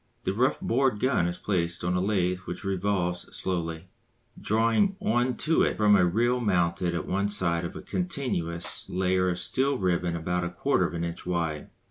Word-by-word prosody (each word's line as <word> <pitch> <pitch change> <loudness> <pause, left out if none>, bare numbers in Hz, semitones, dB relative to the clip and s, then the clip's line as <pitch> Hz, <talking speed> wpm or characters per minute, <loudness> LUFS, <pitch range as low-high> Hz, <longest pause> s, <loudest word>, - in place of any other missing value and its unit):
The - - 0
rough 125 +6 +1
bored 125 -2 +1
gun 125 -9 +2
is 85 0 -3
placed 85 -4 -1
upon 90 +1 0
a 90 - +1
lathe 90 -2 +1
which 90 - -6
revolves 95 -2 -1
slowly, 85 -1 -3 0.5
drawing 115 - +2
on 120 +1 +1
to 160 +1 +3
it - - +1
from 105 -1 +5
a 95 - +5
reel 120 +8 +2
mounted 90 -5 +1
at - - -2
one 100 +2 0
side 90 -5 0
a - - -6
continuous 125 - -3
layer 90 0 +1
of 85 - -1
steel 135 +6 0
ribbon 90 -3 0
about 90 +2 -1
a 85 - -2
quarter 85 0 +1
of - - -7
an 85 - -2
inch 85 +1 -5
wide. 85 -4 -2
90 Hz, 180 wpm, -27 LUFS, 85-110 Hz, 0.5 s, from